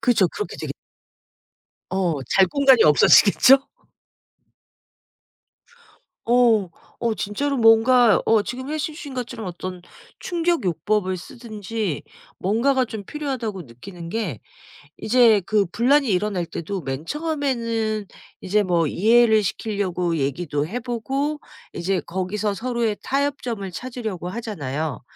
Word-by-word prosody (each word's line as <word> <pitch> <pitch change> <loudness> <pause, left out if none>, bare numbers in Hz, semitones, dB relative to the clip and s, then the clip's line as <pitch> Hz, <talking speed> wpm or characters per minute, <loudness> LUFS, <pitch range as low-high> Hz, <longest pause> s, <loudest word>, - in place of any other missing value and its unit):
그쵸. 230 -7 +3
그렇게 420 - -6
되겠 - - -4 1.2
어 180 -6 0
잘 190 -1 +4
공간이 270 +1 +4
없어지겠죠? 215 - +6 2.6
어. 230 -5 +3 0.3
어 235 -1 0
진짜로 275 +8 -2
뭔가 225 0 +5
어 225 -1 +4
지금 260 +5 -6
해 310 - -2
주신 300 -1 -5
것처럼 245 -3 -5
어떤 180 0 -7 0.4
충격요법을 210 - -1
쓰든지 215 - -5 0.4
뭔가가 250 +7 +1
좀 220 -3 -7
필요하다고 250 -9 -4
느끼는 165 +7 -11
게 185 - -3 0.6
이제 230 -2 +4
그 210 -2 +2
분란이 250 +10 +2
일어날 185 -2 0
때도 180 +3 -5
맨 135 +2 -5
처음에는 235 -9 -2 0.4
이제 205 +3 +1
뭐 175 -4 +1
이해를 220 +6 +4
시키려고 190 -4 -2
얘기도 145 +1 -2
해 230 +8 -4
보고 265 +5 -3 0.3
이제 185 +2 -1
거기서 195 +4 -3
서로의 235 -1 -1
타협점을 265 -7 -2
찾으려고 220 -5 -5
하잖아요. 160 - -4
215 Hz, 260 characters per minute, -22 LUFS, 185-250 Hz, 2.6 s, 없어지겠죠